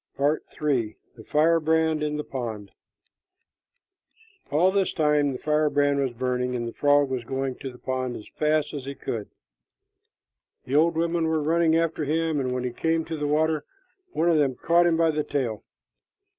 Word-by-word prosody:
PART 145 +3 +1 0.2
III. 130 -8 0 0.2
THE 110 - -12
FIREBRAND 160 +1 +2
IN 150 0 -1
THE 150 - -3
POND. 110 -8 -6 1.8
All 175 +6 +3
this 195 -1 +1
time 150 -2 +2
the 130 - -4
firebrand 145 -2 +1
was 135 -1 +1
burning, 125 +1 -1
and 120 -1 -3
the 115 - -6
frog 145 0 +3
was 130 -2 -2
going 135 +2 -2
to 135 - -6
the 125 - -14
pond 130 -1 -3
as 105 - -9
fast 155 0 0
as 140 -3 -5
he 140 +1 -6
could. 110 -6 -5 1.4
The 130 - -6
old 165 +2 +3
women 170 0 +1
were 160 0 +1
running 165 +1 +3
after 165 -1 0
him, 160 0 0
and 130 -2 -1
when 125 0 -2
he 125 - -2
came 160 +5 0
to 165 - -4
the 150 -1 -2
water, 155 0 +1 0.5
one 170 - 0
of 165 -3 +4
them 135 -3 +1
caught 170 +4 +3
him 165 -1 +2
by 165 -1 +3
the 150 0 -1
tail. 125 -8 -2
150 Hz, 180 wpm, -25 LUFS, 130-160 Hz, 1.8 s, of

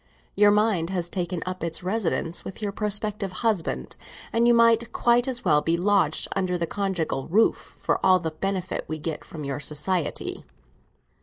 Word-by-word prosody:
Your 205 0 +6
mind 205 -5 +2
has 175 -2 -3
taken 180 -2 -3
up 185 -1 -5
its 165 +1 -4
residence 180 -4 -1
with 190 - -8
your 210 -2 -2
prospective 210 -1 -1
husband, 210 -7 -1 0.4
and 235 +1 +3
you 240 - +6
might 230 0 +4
quite 240 +2 +3
as 250 -3 -3
well 150 -4 +4
be 165 +2 +1
lodged 180 -4 +2
under 185 -2 0
the 170 - -1
conjugal 180 -8 -2
roof, 215 +7 +1
for - - -1
all 185 -1 +6
the 165 -3 -3
benefit 185 +3 -3
we 155 - -3
get 155 0 -4
from 155 -2 -8
your 140 +1 -3
society." 150 +4 -2
185 Hz, 170 wpm, -25 LUFS, 165-210 Hz, 0.4 s, Your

